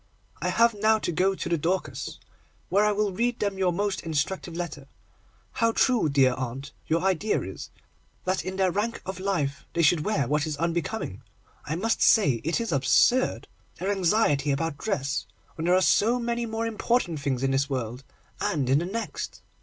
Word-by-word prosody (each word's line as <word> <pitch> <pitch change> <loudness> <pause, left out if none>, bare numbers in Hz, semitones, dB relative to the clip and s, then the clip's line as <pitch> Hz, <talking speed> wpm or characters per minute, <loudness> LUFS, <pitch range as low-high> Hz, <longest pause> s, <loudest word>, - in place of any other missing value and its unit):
I - - 0
have 235 0 +4
now 215 +1 +3
to 210 - -2
go 185 +4 +2
to - - -4
the 170 -2 0
Dorcas, 180 +5 -2 0.5
where 200 +2 +3
I 210 - +3
will 210 -1 0
read 235 +5 -1
them 200 -2 -1
your 185 -2 +2
most 195 +1 -1
instructive 165 +2 -2
letter. 155 -5 -5 0.6
How 230 -3 +1
true, 240 - +3
dear 135 -3 +4
aunt, 130 +2 -5 0.2
your 165 +2 +1
idea 190 +3 +1
is, - - -7 0.6
that 185 +1 0
in 185 +1 -4
their 190 -1 +2
rank 215 +5 -2
of 190 -1 -5
life 150 -8 -1
they 170 0 +1
should 155 0 +4
wear 155 - 0
what 150 +3 0
is 150 -2 -3
unbecoming. 170 - -2 0.4
I 155 - -2
must 225 +6 0
say 140 - +4
it 165 +7 0
is 230 -1 -2
absurd, 140 - +3 0.3
their 190 +3 -2
anxiety 175 -7 +2
about 145 +1 -1
dress, 140 - -2 0.3
when 160 - -5
there 180 +1 +4
are 185 - +4
so 225 +5 +3
many 235 -1 -2
more 225 +1 -2
important 225 -6 0
things 135 -2 -1
in 135 - +2
this 135 +1 +1
world, 125 -1 -3 0.4
and 135 -5 0
in 140 - +5
the 170 - -2
next. 225 +5 -5
175 Hz, 185 wpm, -26 LUFS, 145-210 Hz, 0.6 s, in